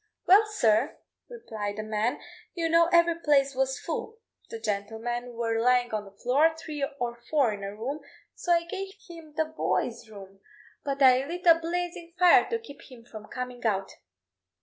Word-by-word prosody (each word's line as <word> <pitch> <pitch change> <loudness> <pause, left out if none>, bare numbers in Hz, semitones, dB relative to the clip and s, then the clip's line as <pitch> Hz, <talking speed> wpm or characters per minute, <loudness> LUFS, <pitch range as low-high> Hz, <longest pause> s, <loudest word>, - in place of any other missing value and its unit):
"Well, 410 +4 +6
sir," 240 - +1 0.3
replied 220 - -5
the 215 - -4
man; 215 +2 -1 0.4
"you 335 -2 -1
know 335 +1 +4
every 340 -1 +5
place 280 -3 +3
was 265 +1 0
full 445 - -5 0.3
the 230 - -6
gentlemen 225 +3 -3
were 230 -1 -1
lying 245 -1 +2
on 210 -1 -2
the 195 - -13
floor, 285 +10 +2
three 300 -3 -5 0.2
or 240 -1 -3
four 275 -8 +3
in 200 -1 -7
a 200 +1 -5
room 260 +8 -4 0.3
so 350 - -3
I 340 -1 +4
gave 385 +2 -6
him 330 -3 -12
the 315 +1 +1
Boy's 280 -7 -2
Room; 195 -2 -12 0.4
but 275 0 -1
I 255 0 +6
lit 350 +3 -6
a 335 - +9
blazing 345 0 -4
fire 360 -1 +6
to 460 - 0
keep 450 -11 -13
him 235 -2 -13
from 215 -3 -11
coming 250 -1 -6
out." 195 -4 0
265 Hz, 175 wpm, -27 LUFS, 225-335 Hz, 0.4 s, a